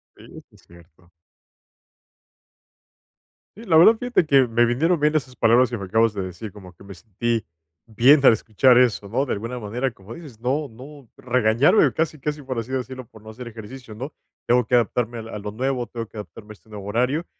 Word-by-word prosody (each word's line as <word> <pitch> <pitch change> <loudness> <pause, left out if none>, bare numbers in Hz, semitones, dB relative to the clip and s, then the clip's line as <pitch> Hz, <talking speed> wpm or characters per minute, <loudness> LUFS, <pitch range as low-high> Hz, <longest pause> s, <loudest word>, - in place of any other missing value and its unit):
Sí. - - -17 0.3
Sí - - -24
es - - -21
cierto. 85 0 -20 2.5
Sí, 230 - -11
la 175 -6 +2
verdad 200 +8 +7
fíjate 245 -8 +1
que 135 -4 +4
me 115 +1 +2
vinieron 160 +9 +1
bien 150 +1 +1
esas 130 -5 -2
palabras 120 +2 +3
y - - -1
me 100 - -7
acabas 110 +3 +2
de 100 - -4
decir 95 +3 -8
como 95 -4 -13
que 95 - -18
me 100 - -10
sentí 115 +4 -3 0.4
bien 130 +6 +4
al - - +9
escuchar 115 +3 +3
eso, 115 -5 +2
¿no?, 130 +5 0
de - - -2
alguna 115 +4 -5
manera, 120 +5 -3
como 100 +1 -13
dices, 140 -9 -12
no 135 +4 -2
no 130 +2 -14
regañarme, 125 - +3
casi, 160 -1 -2
casi 150 +2 -4
por 130 -3 -6
así 115 +3 -7
decirlo, 130 -1 -5
por 110 -1 -18
no 110 - -12
hacer 120 +2 -9
ejercicio, 115 +1 -11
¿no?, 130 +8 -7 0.3
tengo 125 +1 +3
que 125 - +1
adaptarme 120 0 0
a 110 -1 -8
a - - -5
lo 105 0 -6
nuevo, 125 +2 -2
tengo 115 -1 -6
que - - -23
adaptarme 105 0 -10
a - - -8
este 110 +1 -24
nuevo 100 -2 -9
horario, 125 +10 -1
120 Hz, 205 wpm, -22 LUFS, 110-135 Hz, 2.5 s, al